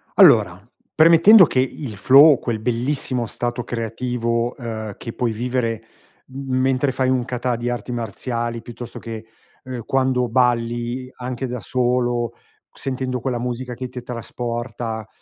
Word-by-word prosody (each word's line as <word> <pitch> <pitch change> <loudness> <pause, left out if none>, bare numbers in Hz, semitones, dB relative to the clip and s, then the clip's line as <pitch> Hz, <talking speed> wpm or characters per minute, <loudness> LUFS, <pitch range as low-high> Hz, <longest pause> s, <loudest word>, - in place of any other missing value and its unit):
Allora, 95 -4 +6 0.3
premettendo 170 +5 +8
che 130 - 0
il 130 -3 -3
flow, 135 +8 +7
quel 115 -3 -3
bellissimo 125 +1 -1
stato 120 +1 -3
creativo, 115 0 -2
uhm, 110 -5 -5
che 115 - -7
puoi 120 -2 -1
vivere 115 -1 -2 0.5
m 135 -1 -3
mentre 130 +1 +1
fai 130 0 0
un 130 -1 +1
kata 125 0 -2
di 120 +1 -3
arti 120 0 -4
marziali, 115 +1 -3
piuttosto 120 +1 -9
che, 115 -1 -7 0.4
ehm, 125 -3 -6
quando 130 -2 +1
balli 120 +1 0
anche 125 +1 -4
da 125 -1 -5
solo, 120 -1 0 0.4
sentendo 130 -1 -3
quella 125 -1 -2
musica 125 +1 -4
che 125 +1 -5
ti 125 0 -8
trasporta, 120 -1 -5
120 Hz, 140 wpm, -21 LUFS, 115-130 Hz, 0.5 s, premettendo